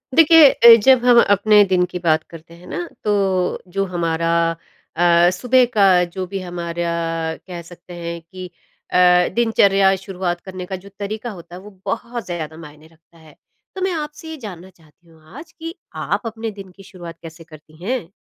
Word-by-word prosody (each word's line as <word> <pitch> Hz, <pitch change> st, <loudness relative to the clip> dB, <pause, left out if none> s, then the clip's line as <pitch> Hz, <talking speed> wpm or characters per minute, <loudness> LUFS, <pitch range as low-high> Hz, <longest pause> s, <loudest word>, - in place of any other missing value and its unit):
देखिए 325 Hz, -2 st, +8 dB
अ, 235 Hz, -1 st, +8 dB
जब 260 Hz, -1 st, +5 dB
हम 245 Hz, -1 st, +6 dB
अपने 205 Hz, +1 st, +5 dB
दिन 185 Hz, -1 st, +2 dB
की 180 Hz, 0 st, -7 dB
बात 160 Hz, -2 st, +1 dB
करते 165 Hz, 0 st, -13 dB
हैं 175 Hz, +1 st, -16 dB
ना, 175 Hz, 0 st, -5 dB, 0.2 s
तो 195 Hz, -3 st, 0 dB
जो 195 Hz, +2 st, -2 dB
हमारा 165 Hz, -2 st, -2 dB, 0.7 s
अ, 175 Hz, +1 st, +4 dB
सुबह 250 Hz, +7 st, +3 dB
का 200 Hz, -2 st, +4 dB, 0.2 s
जो 180 Hz, +2 st, -5 dB
भी 195 Hz, +1 st, -5 dB
हमारा 175 Hz, -1 st, -4 dB, 0.6 s
कह 175 Hz, -2 st, -7 dB
सकते 175 Hz, +1 st, -14 dB
हैं 170 Hz, 0 st, -6 dB
कि 185 Hz, +3 st, -10 dB, 0.5 s
अ, 180 Hz, 0 st, +4 dB
दिनचर्या 200 Hz, -4 st, +3 dB
शुरुआत 180 Hz, -2 st, -4 dB
करने 185 Hz, -1 st, -8 dB
का 190 Hz, -, -5 dB
जो -, -, -11 dB
तरीका 215 Hz, +3 st, -5 dB
होता 175 Hz, -2 st, -12 dB
है, 185 Hz, -, -10 dB
वो 210 Hz, -, -13 dB
बहुत 235 Hz, -1 st, -4 dB
ज़्यादा 160 Hz, -3 st, -6 dB
मायने 155 Hz, -1 st, -13 dB
रखता 165 Hz, +1 st, -26 dB
है। 160 Hz, -2 st, -18 dB, 0.4 s
तो 380 Hz, -, -6 dB
मैं 380 Hz, 0 st, 0 dB
आपसे 300 Hz, 0 st, -6 dB
ये 320 Hz, -, -7 dB
जानना 185 Hz, -1 st, -11 dB
चाहती 165 Hz, -1 st, -26 dB
हूँ 160 Hz, -1 st, -22 dB, 0.2 s
आज 315 Hz, +2 st, -11 dB
कि 330 Hz, +1 st, -9 dB, 0.2 s
आप -, -, -2 dB
अपने 225 Hz, 0 st, -5 dB
दिन 195 Hz, -2 st, -12 dB
की 195 Hz, +2 st, -16 dB
शुरुआत 175 Hz, -4 st, -11 dB
कैसे 165 Hz, 0 st, -11 dB
करती 155 Hz, +1 st, -17 dB
हैं? 235 Hz, -4 st, -3 dB
180 Hz, 185 wpm, -19 LUFS, 170-210 Hz, 0.7 s, देखिए